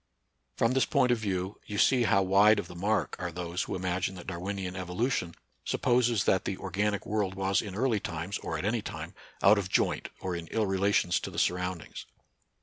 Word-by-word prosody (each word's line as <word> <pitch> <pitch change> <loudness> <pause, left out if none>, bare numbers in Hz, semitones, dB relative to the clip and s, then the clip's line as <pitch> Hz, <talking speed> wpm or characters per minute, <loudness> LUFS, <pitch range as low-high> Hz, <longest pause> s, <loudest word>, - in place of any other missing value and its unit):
From 115 - +3
this 130 0 +2
point 125 - +3
of 120 - +2
view 95 -2 -3
you 105 - -4
see 125 +3 +4
how 100 -2 +4
wide 100 +3 +5
of 100 - -3
the - - -10
mark 105 +5 0
are 90 -1 -3
those 85 +1 -3
who - - -3
imagine 90 +1 -1
that 90 - -9
Dar 85 -2 -5
winian 95 0 -4
evolution 90 0 -2 0.3
supposes 120 -3 +2
that 95 - +2
the 95 - -2
organic 100 +1 -1
world 100 -3 -1
was 95 0 +1
in 100 -3 -7
early 115 -1 +1
times, 85 +3 -4
or 80 - -4
at 80 - -4
any 110 +2 +1
time, - - -7 0.3
out 100 +2 +7
of 95 -2 -4
joint - - +1
or 95 -2 -3
in 85 -1 -6
ill 110 +4 0
relations 95 -2 +2
to - - -5
the - - -10
surroundings. 90 -2 -2
95 Hz, 205 wpm, -29 LUFS, 90-105 Hz, 0.3 s, out